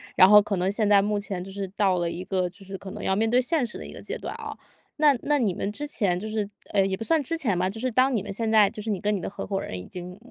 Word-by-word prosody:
然 185 - +8
后 210 0 +9
可 205 -1 -2
能 185 +2 0
现 210 0 0
在 205 -1 +6
目 205 +1 0
前 195 -3 -4
就 195 - -9
是 195 -1 -5
到 195 -3 +2
了 170 -1 0
一 175 +2 -5
个 185 -2 -1
就 195 +3 -13
是 195 0 -6
可 190 0 -9
能 - - -7
要 190 - +1
面 225 +1 +2
对 245 +2 +4
现 260 -1 0
实 - - -7
的 - - -8
一 - - -9
个 - - -10
阶 - - -4
段 - - -6
啊， - - -7 0.4
那 300 -1 +5
那 295 0 +2
你 215 -8 +1
们 195 - -3
之 290 +6 -4
前 195 -11 0
就 200 - -6
是 215 -2 -2 0.2
哎， 205 - +2
也 190 0 -1
不 225 - -6
算 320 +6 +2
之 330 +4 -2
前 210 - 0
吧， 185 +1 +1
就 220 +4 -6
是 255 - 0
当 255 +2 +3
你 205 - -1
们 205 - -6
现 225 +2 -2
在 215 -2 +5
就 210 - -8
是 220 - -5
你 200 -4 -1
跟 210 0 +1
你 200 - -1
的 - - -4
合 195 0 -6
伙 195 -1 -2
人 95 - -5
已 90 - -7
经 180 - -8
205 Hz, 360 characters per minute, -26 LUFS, 190-225 Hz, 0.4 s, 后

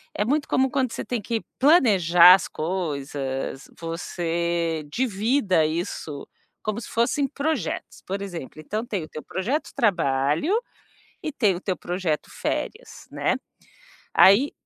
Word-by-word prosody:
é 210 - 0
muito 285 +5 0
comum, 265 +1 +2
quando 260 -3 0
você - - -5
tem 240 -3 -2
que 225 +2 -2 0.2
planejar 190 - +7
as 185 - +2
coisas, 140 -6 -3
você 170 -1 -2
divida 215 - +1
isso 155 -3 -4 0.4
como 215 +2 -2
se - - -9
fossem 255 +4 +1
projetos. 285 - -3
Por 195 +1 -3
exemplo, 170 -6 -7
então 215 +9 -4
tem 200 -8 -3
o - - -8
teu 155 - -8
projeto 245 - -2
trabalho. 165 - +1 0.7
E 310 - -1
tem 215 -9 +2
o 175 - -6
teu 190 -2 -2
projeto 175 -4 -2
férias, 460 +4 -4
né? - - 0 0.8
Aí, 220 - +6
190 Hz, 135 wpm, -24 LUFS, 165-240 Hz, 0.8 s, planejar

